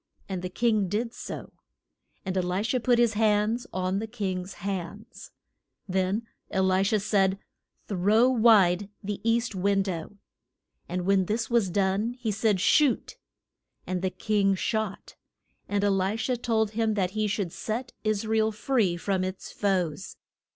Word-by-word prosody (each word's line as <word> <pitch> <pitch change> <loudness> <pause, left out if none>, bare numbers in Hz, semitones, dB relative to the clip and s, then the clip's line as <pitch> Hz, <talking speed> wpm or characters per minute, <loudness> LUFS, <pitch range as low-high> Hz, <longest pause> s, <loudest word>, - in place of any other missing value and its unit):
And 190 -2 -4
the 180 - -4
king 215 -2 +1
did 230 +4 -2
so, - - -7 0.7
and 190 0 -2
E - - +2
li 180 +3 -1
sha 230 +3 0
put 245 0 +3
his 235 -2 +3
hands 220 +2 +1
on 185 +1 -1
the 220 - -4
king's 190 -4 -4
hands. 200 +3 -6 0.6
Then 190 +4 0 0.3
E - - 0
li 190 0 +3
sha 205 +2 +2
said, 195 -2 +2 0.5
Throw 210 +5 +3
wide 205 -6 +4
the 205 0 -4
east 230 0 +1
win 195 +1 +1
dow. 185 -1 -5 0.8
And 180 0 -2
when 195 -1 +3
this 225 +4 -2
was 230 -5 +3
done 200 +5 0
he 245 -3 -3
said 210 -1 +1
shoot. 275 +6 +3 0.7
And 185 -1 -2
the 190 - 0
king 200 0 +1
shot; 215 +1 -3 0.5
and 205 0 0
E - - +3
li 195 +2 +1
sha 240 +3 -1
told 225 -3 0
him 220 -1 0
that 185 -3 0
he 215 +1 0
should 200 -4 -2
set 240 +3 -4
Is 215 -1 0
ra 220 0 +1
el 220 0 +2
free 215 -5 +1
from 190 +2 -1
its 185 0 -5
foes. 185 -4 -1
205 Hz, 165 wpm, -27 LUFS, 190-220 Hz, 0.8 s, wide